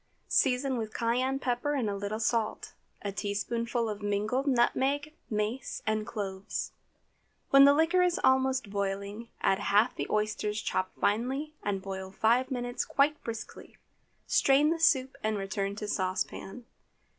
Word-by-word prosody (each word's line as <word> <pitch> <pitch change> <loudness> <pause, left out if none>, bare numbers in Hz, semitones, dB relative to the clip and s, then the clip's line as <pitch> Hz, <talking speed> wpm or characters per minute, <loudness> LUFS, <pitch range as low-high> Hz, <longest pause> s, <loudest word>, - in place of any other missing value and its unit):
Season 260 0 +2
with 220 -2 -5
cayenne 250 +3 +1
pepper 255 +2 -1
and 250 -6 0
a 200 - -1
little 205 +2 -3
salt, 230 -1 -1 0.3
a 200 - -2
teaspoonful 230 +4 -2
of 210 -1 -4
mingled 210 +7 -1
nutmeg, 275 +4 +1 0.2
mace, 215 +4 -2
and 215 0 -1
cloves. 200 -4 -4 0.8
When 275 -1 +9
the 280 - +7
liquor 325 +4 +3
is 360 -1 +2
almost 260 -4 +2
boiling, 200 +3 -3
add 195 - +2
half 205 +4 +3
the - - -3
oysters 210 0 -1
chopped 185 -3 -2
finely 265 +8 0
and 195 -2 -2
boil 190 -1 -5
five 235 +6 +2
minutes 245 -2 -2
quite 295 +1 +1
briskly. 225 -1 -7 0.5
Strain 285 +3 +4
the 330 - -1
soup 270 -6 +3
and 215 0 0
return 195 0 -2
to 210 0 -5
saucepan. 195 +4 -3
230 Hz, 145 wpm, -29 LUFS, 205-265 Hz, 0.8 s, When